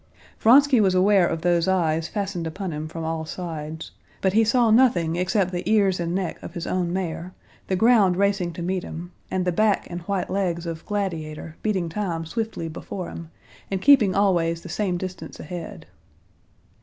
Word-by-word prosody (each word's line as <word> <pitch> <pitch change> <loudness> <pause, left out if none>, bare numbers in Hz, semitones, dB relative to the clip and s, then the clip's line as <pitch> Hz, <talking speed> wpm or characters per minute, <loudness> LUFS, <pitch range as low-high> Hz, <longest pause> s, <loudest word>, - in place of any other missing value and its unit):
Vronsky 260 +1 +6
was 190 -2 +3
aware 190 -1 +4
of 165 -1 -3
those 175 -1 +2
eyes 165 -3 +1
fastened 195 -5 -3
upon 185 +3 -4
him 150 +1 -4
from 165 +1 -6
all 160 0 -2
sides, 160 -1 -6 0.3
but 190 -1 +1
he 225 +2 +5
saw 230 0 +3
nothing 200 -9 +4
except 185 +1 +1
the 175 -1 -2
ears 195 -4 +3
and 170 0 -2
neck 190 -2 -3
of 170 - -9
his 170 - -4
own 180 -2 -1
mare, 180 -1 -4 0.3
the 190 - 0
ground 205 -3 +4
racing 195 -3 +1
to 170 - -6
meet 185 +1 -1
him, 175 +2 -7 0.2
and 185 -1 -1
the 180 - +2
back 210 +3 +2
and 175 0 -5
white 195 -2 -1
legs 175 -3 -1
of 165 -1 -5
Gladiator 165 -6 -4
beating 190 -5 0
time 165 -2 -3
swiftly 220 -2 -3
before 170 +3 -6
him, 165 -1 -8 0.4
and 195 - -1
keeping 220 -5 +5
always 170 -4 +2
the - - -10
same 190 -4 -1
distance 180 -3 -7
ahead. 170 +1 -7
180 Hz, 180 wpm, -24 LUFS, 165-200 Hz, 0.4 s, Vronsky